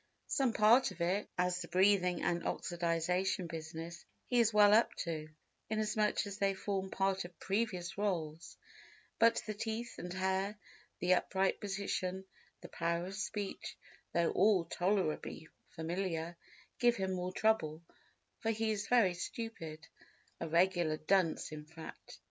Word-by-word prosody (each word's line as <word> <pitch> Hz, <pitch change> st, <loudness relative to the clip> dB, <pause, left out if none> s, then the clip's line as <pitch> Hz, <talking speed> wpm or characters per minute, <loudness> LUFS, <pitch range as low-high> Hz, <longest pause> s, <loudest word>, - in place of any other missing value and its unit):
Some 270 Hz, -4 st, +1 dB
part 225 Hz, +4 st, +5 dB
of -, -, -12 dB
it, 185 Hz, +5 st, 0 dB
as 180 Hz, 0 st, +1 dB
the 170 Hz, -, -6 dB
breathing 185 Hz, -2 st, +3 dB
and 170 Hz, 0 st, +1 dB
oxidisation 175 Hz, +2 st, 0 dB
business, 165 Hz, +1 st, -7 dB, 0.2 s
he 245 Hz, -, +2 dB
is 230 Hz, -1 st, +4 dB
well 210 Hz, -1 st, +7 dB
up 225 Hz, +2 st, +4 dB
to, 155 Hz, -2 st, -4 dB, 0.4 s
inasmuch 215 Hz, -1 st, +1 dB
as 200 Hz, 0 st, -7 dB
they 195 Hz, -1 st, +2 dB
form 190 Hz, 0 st, -2 dB
part 195 Hz, 0 st, 0 dB
of 175 Hz, -1 st, -12 dB
previous 195 Hz, -3 st, -2 dB
roles, 165 Hz, -6 st, -2 dB, 0.6 s
but 230 Hz, 0 st, +5 dB
the 215 Hz, -, -3 dB
teeth 225 Hz, +3 st, -4 dB
and 180 Hz, -, -5 dB
hair, 190 Hz, +2 st, 0 dB, 0.4 s
the 180 Hz, +1 st, +3 dB
upright 190 Hz, +1 st, +1 dB
position, 195 Hz, -2 st, -2 dB, 0.4 s
the -, -, -8 dB
power 170 Hz, +1 st, -1 dB
of 190 Hz, -, -6 dB
speech, 205 Hz, 0 st, -4 dB, 0.3 s
though 170 Hz, -1 st, +2 dB
all 200 Hz, -4 st, +4 dB
tolerably 175 Hz, -3 st, -1 dB, 0.2 s
familiar, 170 Hz, 0 st, -3 dB, 0.4 s
give 240 Hz, -1 st, +4 dB
him 190 Hz, -2 st, -1 dB
more 180 Hz, 0 st, -2 dB
trouble—for 170 Hz, +1 st, -2 dB
he 220 Hz, 0 st, +1 dB
is 210 Hz, -1 st, -2 dB
very 230 Hz, -7 st, +4 dB
stupid—a 170 Hz, -7 st, -8 dB
regular 170 Hz, -2 st, +3 dB
dunce 170 Hz, 0 st, +1 dB
in 150 Hz, -1 st, -6 dB
fact. 160 Hz, +1 st, -11 dB
190 Hz, 135 wpm, -34 LUFS, 170-210 Hz, 0.6 s, well